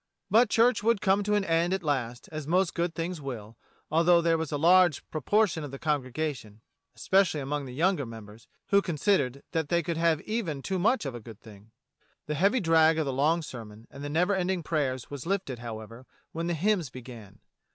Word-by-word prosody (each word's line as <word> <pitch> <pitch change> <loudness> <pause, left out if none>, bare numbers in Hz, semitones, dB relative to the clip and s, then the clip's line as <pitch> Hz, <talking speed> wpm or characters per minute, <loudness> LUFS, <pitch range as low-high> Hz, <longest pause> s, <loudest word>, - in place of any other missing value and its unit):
But 230 +2 +5
church 235 +2 +3
would 230 0 +2
come 195 +1 +2
to 210 +1 0
an 205 -2 +1
end 170 +2 +1
at 190 - -5
last, 125 -5 -2
as 155 -2 -6
most 180 +2 +2
good 170 0 -2
things 170 -1 -4
will, 115 -5 -7 0.4
although 170 +2 +5
there 165 -1 +2
was 160 -2 -3
a 145 - -1
large 175 -1 +4
proportion 165 - +1
of 145 - -6
the 135 - -8
congregation 135 -6 -3 0.2
— - - -51
especially 185 +6 +2
among 145 +1 -3
the 125 - -8
younger 165 -3 +1
members 110 -1 -12
— - - -54
who 200 0 +5
considered 150 -6 0
that 160 -4 -1
they 170 0 +1
could 165 +1 -3
have 165 -2 +2
even 185 -11 -3
too 190 -1 -2
much 225 - +2
of 135 - -4
a 120 - -6
good 115 -1 -12
thing. 105 -2 -15 0.6
The 150 - -3
heavy 200 - +2
drag 165 -3 +4
of 160 - 0
the 135 - -2
long 155 +5 +2
sermon 115 -5 -10
and 145 +1 -7
never 180 +6 +2
ending 185 -2 -1
prayers 140 -6 -2
was 145 +1 -7
lifted, 185 -11 -2
however, 115 +1 -8 0.2
when 165 +1 -3
the 175 - 0
hymns 180 -2 0
began. 115 -6 -11
155 Hz, 205 wpm, -28 LUFS, 130-180 Hz, 0.6 s, But